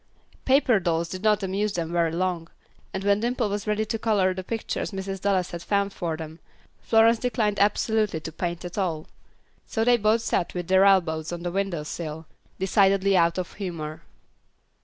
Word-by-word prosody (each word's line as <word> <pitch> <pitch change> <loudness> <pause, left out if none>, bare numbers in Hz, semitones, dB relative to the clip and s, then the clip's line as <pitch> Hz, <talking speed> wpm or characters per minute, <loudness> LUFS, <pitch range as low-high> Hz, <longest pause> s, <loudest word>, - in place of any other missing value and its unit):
Paper 260 -4 +4
dolls 170 -2 -1
did 185 - -6
not 210 -1 +2
amuse 195 +2 -1
them 165 -1 -3
very 170 -1 +1
long; 170 -1 -2 0.4
and 190 - -4
when 200 0 +3
Dimple 240 -1 0
was 205 +1 -3
ready 210 +1 0
to 225 +1 -3
color 205 -5 +2
the 185 0 -6
pictures 225 +3 -3
Mrs. 195 -1 -5
Dallas 190 -3 +1
had 170 - -6
found 200 +1 0
for 165 -2 -3
them, 160 +1 -8 0.4
Florence 225 0 +4
declined 215 -4 0
absolutely 210 -2 +1
to 160 - -6
paint 170 +1 -4
at 175 +3 -5
all. 165 -5 -2 0.6
So 225 - -1
they 245 +1 +5
both 220 +1 +2
sat 180 - -1
with 175 -1 -4
their 190 +1 +5
elbows 165 -5 +2
on 175 0 -5
the 175 - -2
window 190 -4 -2
sill, 160 0 -6 0.3
decidedly 195 0 +3
out 170 -1 +3
of 180 -2 -4
humor. 160 -5 -6
190 Hz, 180 wpm, -25 LUFS, 170-210 Hz, 0.6 s, they